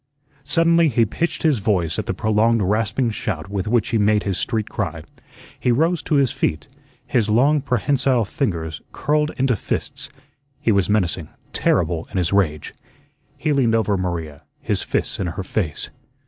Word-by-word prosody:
Suddenly 165 +3 +4
he 115 -4 +3
pitched 170 - -2
his 150 -7 +3
voice 95 -6 0
at - - -4
the - - 0
prolonged 110 +1 +2
rasping 110 +5 +1
shout 100 -6 -4
with 100 -1 -2
which 115 -1 +1
he 115 - +1
made 105 0 +3
his 100 -2 -1
street 110 +2 -1
cry. - - -4 0.6
He 125 - +2
rose 165 +7 +2
to 155 - -1
his 140 -3 +3
feet, 75 - -2 0.4
his 115 -5 +1
long, 140 +7 +4
prehensile 125 -1 +1
fingers 85 - -3
curled 150 +1 +1
into 130 -2 +2
fists. - - -4 0.5
He 115 - +1
was 100 -2 +2
menacing, 90 -6 0 0.2
terrible 85 -2 +1
in - - -5
his 90 0 +1
rage. 75 -7 0 0.6
He 155 -2 0
leaned 120 -5 +3
over 110 -2 +1
Maria, 85 -5 -3 0.2
his - - -1
fists - - -2
in 95 - -1
her 90 +3 -4
face. 90 -5 -3
110 Hz, 165 wpm, -21 LUFS, 95-130 Hz, 0.6 s, Suddenly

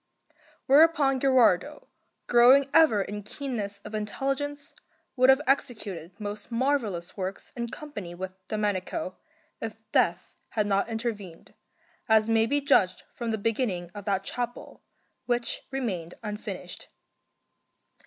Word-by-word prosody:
Whereupon 285 -2 +5
Gherardo, 260 0 +3 0.4
growing 260 +3 +6
ever 305 -12 +5
in 205 +2 -6
keenness 210 -3 -4
of 210 - -8
intelligence, 275 +7 -3 0.4
would 255 +1 +4
have 265 +2 +6
executed 200 - -2
most 205 +1 -6
marvellous 230 -8 -1
works 190 0 -5
in 235 -1 -3
company 210 - -7
with 185 +1 -6
Domenico, 205 -3 -2 0.4
if 225 -1 -4 0.2
death 175 +2 +1 0.2
had 215 -2 0
not 200 +2 +1
intervened, 220 -7 -5 0.6
as 220 0 +5
may 225 0 +4
be 285 +4 +1
judged 185 -9 +3
from 235 -1 -4
the 220 - 0
beginning 205 -5 -1
of 205 -1 -8
that 195 -2 0
chapel, 245 +3 -5 0.5
which 240 -1 -1
remained 195 -11 -3
unfinished. 210 -1 -6
220 Hz, 120 wpm, -27 LUFS, 200-265 Hz, 0.6 s, growing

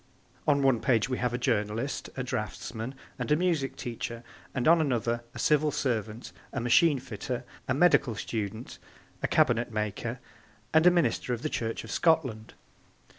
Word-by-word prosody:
On 140 -2 +3
one 135 -4 +4
page 120 -3 +2
we 130 - -1
have 125 -1 0
a 120 - -1
journalist, 115 +1 -1
a 125 - -1
draughtsman 115 +1 -4 0.2
and - - -3
a - - +6
music 165 -5 0
teacher: 115 0 -5 0.3
and 130 - 0
on 165 0 +6
another 120 -4 0
a - - -6
Civil 150 0 +3
servant, 120 -6 -2 0.2
a 130 - -2
machine 125 +6 +4
fitter, 125 0 -5 0.2
a 130 - +1
medical 140 -7 +4
student, 110 +2 -5 0.4
a - - +1
cabinet 120 0 +2
maker 105 -2 -3 0.6
and 160 +2 +6
a - - +11
minister 140 -7 +1
of 120 - -11
the 155 - 0
Church 115 -4 -3
of 110 - -8
Scotland. 130 -10 +1
125 Hz, 165 wpm, -29 LUFS, 115-145 Hz, 0.6 s, a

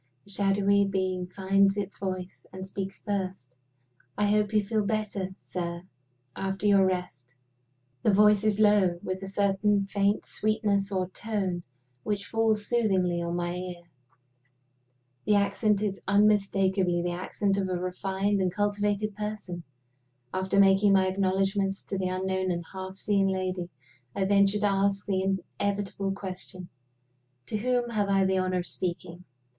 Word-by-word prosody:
The 200 - -8
shadowy 200 0 +3
being 185 -2 -1
finds 195 +1 +2
its 200 -1 -4
voice, 185 -1 -5
and 190 0 -7
speaks 195 0 -6
first. 185 -11 -4 0.6
"I 210 - +2
hope 210 0 +2
you 210 -1 +2
feel 215 +1 0
better, 205 -2 -2
sir, 170 -1 -5 0.5
after 195 +1 -3
your 200 -2 +5
rest?" 135 -9 -4 0.7
The 215 - +3
voice 210 0 +5
is 215 -1 +1
low, 205 -5 +4
with 185 0 -3
a 195 - -5
certain 200 +1 +1
faint 200 +1 0
sweetness 210 -2 0
or 185 -2 -1
tone 190 -3 -3 0.4
which 205 +6 -2
falls 220 -1 +1
soothingly 190 -7 +1
on 170 0 -2
my 175 0 -2
ear. 180 -1 -6 1.4
The 210 - +4
accent 200 +1 +2
is 200 -2 -2
unmistakably 195 -3 +2
the 175 - -1
accent 195 +3 -1
of 190 -1 -1
a - - -1
refined 190 +2 -1
and 185 -1 +1
cultivated 205 +1 -1
person. 210 -4 -5 0.7
After 190 +1 +1
making 195 +1 +5
my 190 -1 +4
acknowledgments 195 +1 0
to 195 - -4
the 185 -1 -1
unknown 190 0 -1
and 170 -1 -2
half 190 0 -6
seen 195 0 +1
lady, 185 -2 -2 0.5
I 195 - +1
venture 200 +1 +4
to - - +2
ask 195 0 +1
the 190 -1 +1 0.2
inevitable 200 -1 -1
question, 185 -2 -7 0.8
"To 215 - -3
whom 245 +1 0
have 205 -3 0
I 195 -1 +3
the 190 0 +2
honor 185 0 0
of - - -8
speaking?" 175 0 -4
195 Hz, 150 wpm, -28 LUFS, 185-205 Hz, 1.4 s, your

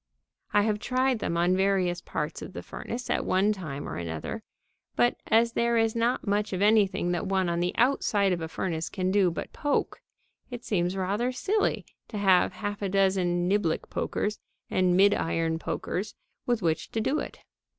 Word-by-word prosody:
I 205 -1 +4
have 210 -1 0
tried 255 +1 +1
them 170 - -2
on 175 +2 +3
various 185 -2 +1
parts - - -4
of - - -8
the - - -7
furnace 245 +1 -6
at - - 0
one 200 +3 +2
time 155 -8 -6
or - - -5
another, 85 - -5 0.5
but, 240 - +3
as 230 +1 +3
there 235 0 +2
is 225 0 +2
not 235 +2 0
much 205 0 0
of 185 - -2
anything 200 -4 +3
that 175 +2 -2
one 190 -1 +1
on 170 0 0
the 175 +1 -1
outside 210 -6 +2
of 170 - -3
a 160 - -3
furnace 160 -1 -3
can 185 -1 -1
do 195 -2 +4
but 170 - -6
poke, 290 -1 -1 0.5
it 245 -2 -7
seems 180 -2 0
rather 205 +7 0
silly 400 +12 0 0.2
to 215 - -6
have 190 -3 +4
half 205 -1 -4
a 200 - -1
dozen 185 -2 +2
niblick 190 -4 0
pokers 210 0 -2 0.3
and 180 -1 +3
midiron 165 -5 +2
pokers 200 +4 -3 0.3
with 240 -5 +1
which 160 -2 0
to 225 - 0
do 265 +7 0
it. - - -7
195 Hz, 180 wpm, -27 LUFS, 180-225 Hz, 0.5 s, I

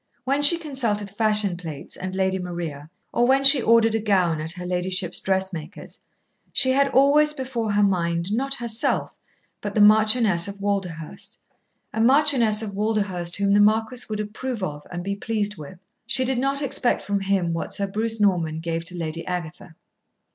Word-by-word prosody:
When 275 +2 0
she 310 +4 +6
consulted 235 - -2
fashion 210 -3 +1
plates 160 -5 -8
and 185 0 -6
Lady 190 0 0
Maria, 170 -5 -6 0.2
or 240 - +2
when 270 +1 +3
she 275 -1 +7
ordered 225 -1 +3
a 225 - +1
gown 185 -7 +1
at 160 +2 -4
her 180 -1 -8
ladyship's 180 0 -2
dressmaker's, 190 -4 -4 0.5
she 260 -1 +3
had 275 +1 +3
always 285 +3 +4
before 250 -6 -3
her 205 0 +3
mind, 170 -1 0
not 270 +4 0
herself, 235 -3 -1 0.5
but 205 -1 -5
the - - +1
Marchioness 215 -3 +4
of 200 0 -8
Walderhurst 195 +1 -4 0.6
a 220 - -1
Marchioness 245 -4 +4
of 205 -2 -6
Walderhurst 200 -4 -1
whom 200 0 +1
the 205 - +4
Marquis 220 +4 +2
would 215 -1 -4
approve 215 +2 -5
of 150 -4 -6
and 175 -1 -5
be 200 +1 -3
pleased 210 -1 -3
with. 155 +5 -10 0.3
She 260 - +3
did 255 -1 0
not 275 +2 -1
expect 250 -2 +1
from 200 0 -1
him 190 -3 0
what 165 - -4
Sir 200 - 0
Bruce 220 +3 -3
Norman 170 -6 +1
gave 165 0 -3
to 180 +1 -5
Lady 165 0 -4
Agatha. 175 0 -6
205 Hz, 175 wpm, -23 LUFS, 180-230 Hz, 0.6 s, she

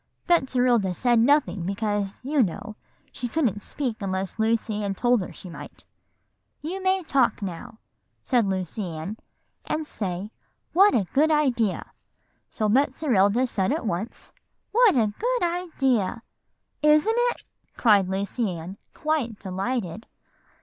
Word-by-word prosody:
"Betserilda 250 - +2
said 240 +1 +3
nothing, 255 - +3
because, 200 +1 -2
you 285 0 +2
know, 215 +1 -2 0.4
she 245 - -4
couldn't 235 - 0
speak 250 -3 -3
unless 190 +1 -3
Lucy 220 -1 0
Ann 200 -1 -2
told 245 +1 +2
her 180 - -6
she - - -11
might. 170 - -10 0.8
'You 355 +6 -5
may 375 0 +1
talk 265 -8 +1
now,' 185 +3 -6 0.5
said 240 -5 +2
Lucy 190 +2 -3
Ann, 165 +7 -6 0.5
'and 310 0 -2
say, 195 -5 -4 0.4
"What 395 +4 +6
a 210 -5 +2
good 305 +3 +4
idea."' 255 -10 +1 0.6
So 215 - -1
Betserilda 245 -2 +2
said 195 -2 0
at 300 -3 -2
once, 210 +4 -4 0.4
'What 470 - +5
a 215 -4 +2
good - - 0
idea.' 270 - 0 0.6
"'Isn't 305 +9 +4
it?' 485 0 0 0.3
cried 205 -5 +4
Lucy 200 +4 -2
Ann, 175 +5 -8 0.2
quite 300 -8 -1
delighted." 195 +1 -4
230 Hz, 130 wpm, -25 LUFS, 195-295 Hz, 0.8 s, What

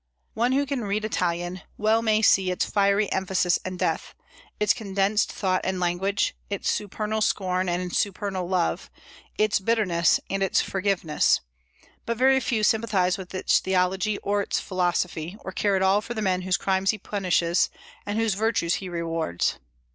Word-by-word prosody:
One 240 +3 +1
who 280 +1 +2
can 275 -2 -2
read 210 +1 -1
Italian 175 -2 -2 0.2
well 220 +1 +2
may 220 -1 +2
see 190 -2 +4
its 180 - 0
"fiery 200 0 +2
emphasis 190 -2 +1
and 185 0 -5
depth," - - -2 0.4
its 210 -1 +3
condensed 200 -1 0
thought 185 -2 0
and 190 -1 -1
language, 180 +3 0
its 200 -1 -1
supernal 215 +1 -2
scorn 185 -3 0
and 180 0 -2
supernal 195 -2 -1
love, 85 - 0 0.5
its 215 -1 +2
bitterness 190 -5 +2
and 195 +1 -2
its 195 - +2
forgiveness; 190 -5 +1 0.7
but 230 0 -1
very 265 +2 +4
few 230 -3 -1
sympathize 205 -5 +2
with 190 0 -8
its 185 - +3
theology 190 +2 0
or 205 0 +1
its - - -1
philosophy, 180 -1 -2
or 190 - -4
care 200 +1 +1
at 190 - +1
all 195 +2 +3
for 230 +2 -6
the 215 - -2
men 185 -2 +1
whose 185 0 +1
crimes 190 0 0
he 215 - +2
punishes, 180 -4 +1 0.3
and 205 +1 -3
whose 225 -2 +1
virtues 205 -5 0
he 185 - -6
rewards. 165 - -2
195 Hz, 165 wpm, -25 LUFS, 180-215 Hz, 0.7 s, see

